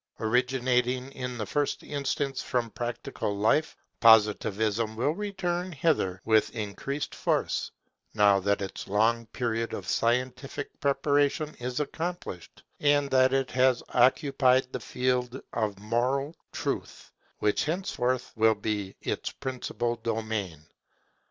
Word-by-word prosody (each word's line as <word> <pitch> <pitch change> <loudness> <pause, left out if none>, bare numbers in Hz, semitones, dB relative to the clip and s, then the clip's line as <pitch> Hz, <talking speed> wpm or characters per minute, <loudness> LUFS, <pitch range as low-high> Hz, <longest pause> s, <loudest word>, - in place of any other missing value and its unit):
Originating 125 +2 +1
in 125 -2 -5
the 110 - -3
first 145 +6 -1
instance 140 -2 -2
from 120 -3 -1
practical 120 -4 -3
life, 110 +9 +2 0.2
Positivism 110 0 +4
will 125 +6 +1
return 180 -2 -3
thither 95 - +1
with 110 -1 +4
increased 115 +7 -4
force, - - 0 0.5
now 100 -2 +5
that 100 +1 0
its 95 - -6
long 115 +3 +2
period 115 -1 -2
of 95 - -7
scientific 125 +4 -1
preparation 145 +1 +1
is 125 +2 -3
accomplished, 160 - -5 0.2
and 145 -1 +3
that 130 0 +5
it 135 -1 0
has 130 -1 +3
occupied 130 0 +4
the - - -2
field 125 0 -1
of 105 -3 -1
moral 125 +8 0 0.2
truth, - - -4 0.3
which 105 - +1
henceforth 130 -7 -1
will 110 0 +4
be 105 -2 -3
its - - -2
principal 125 -3 -3
domain. 110 -8 -3
125 Hz, 120 wpm, -28 LUFS, 110-135 Hz, 0.5 s, now